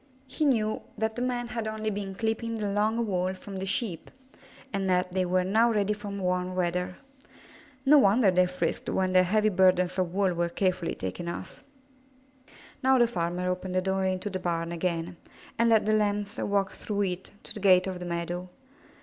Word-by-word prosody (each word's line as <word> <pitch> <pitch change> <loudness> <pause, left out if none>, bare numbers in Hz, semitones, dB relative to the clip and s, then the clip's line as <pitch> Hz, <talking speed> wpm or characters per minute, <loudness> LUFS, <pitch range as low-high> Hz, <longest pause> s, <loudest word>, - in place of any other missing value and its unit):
He 285 +4 -2
knew 220 -6 +1 0.2
that 220 0 -1
the 245 - -3
men 245 -1 -1
had 230 -2 -3
only 215 0 -2
been 195 -1 -4
clipping 225 +2 -2
the 205 -2 -2
long 215 +3 +1
wool 185 -2 -1
from 195 +1 -8
the 190 +1 -4
Sheep, 200 -4 -2 0.6
and 195 -1 -1
that 180 0 +1
they 185 0 0
were 185 +1 +2
now 220 +5 +3
ready 210 -1 +1
for 205 0 -8
warm 185 -2 -2
weather. 180 0 -1 0.9
No 295 +2 +7
wonder 205 -2 +4
they 180 0 +3
frisked 180 0 -2
when 185 -1 0
their 185 - +7
heavy 215 +4 +2
burdens 185 -1 +3
of 180 -2 0
wool 190 -1 +1
were 170 0 0
care 185 +1 +1
fully 175 -2 -4
taken 95 - -5
off. 170 - -6 1.2
Now 265 -1 +4
the 240 - +5
farmer 180 -4 -2
opened 180 0 -3
the 185 - +3
door 190 0 0
into 185 +2 -2
the 185 - -3
barn 170 -1 -2
again, 170 0 -2 0.4
and 230 0 +4
let 220 -2 +4
the 215 - +2
Lambs 205 0 0
walk 200 -1 0
through 205 -1 -3
it 185 -1 -4
to - - -8
the - - -7
gate 185 -2 +5
of 185 -2 -4
the 180 - -6
meadow. 175 +1 -3
190 Hz, 195 wpm, -28 LUFS, 180-215 Hz, 1.2 s, No